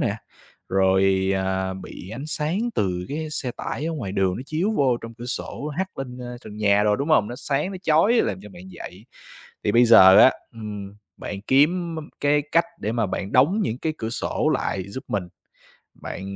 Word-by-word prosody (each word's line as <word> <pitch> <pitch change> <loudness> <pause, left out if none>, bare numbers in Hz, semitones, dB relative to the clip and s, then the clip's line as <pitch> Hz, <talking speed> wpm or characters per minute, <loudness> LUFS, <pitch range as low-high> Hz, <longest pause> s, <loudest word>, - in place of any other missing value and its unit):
nè, - - 0 0.5
rồi, 95 0 +3
à, 95 0 -1
bị 95 0 -9
ánh 135 +7 -6
sáng 155 +4 -1 0.2
từ 90 -2 -1
cái 155 +2 -4
xe 135 -4 -3
tải 150 - -4
ở 165 - -2
ngoài 115 -11 -4
đường 95 -2 +1
nó 125 - -5
chiếu 170 +7 0
vô 130 -4 +3
trong 115 0 -10
cửa 120 +2 -9
sổ 145 +3 -4
hắt 185 +4 -4
lên, 125 -2 -6
ơ, 125 0 -7
trần 105 - -9
nhà 105 -1 +3
đồ, 105 0 +3
đúng 140 +4 -3
hông? 110 -9 +4
Nó 120 - -6
sáng, 145 +6 -1
nó - - -5
chói 165 +7 +4
làm 95 - +1
cho 105 - -10
bạn 90 -1 -12
dậy. - - -10 0.6
Thì - - +1
bây 120 +1 +6
giờ 95 -5 +8
á, 130 - +9 0.2
ừm, 105 -3 -7 0.2
bạn 100 -1 -6
kiếm 165 +5 +3
m 160 - -4 0.2
cái 145 0 +3
cách 170 +1 +4 0.2
để 110 - -2
mà 115 -3 0
bạn 95 +1 -4
đóng 150 +12 +4
những 115 - -2
cái 160 +1 -2
cửa 110 0 -3
sổ - - -1
lại 95 -2 -2
giúp 130 +7 -7
mình. 100 -3 -1 0.8
Bạn, 100 +1 -6
120 Hz, 210 wpm, -23 LUFS, 95-150 Hz, 0.8 s, á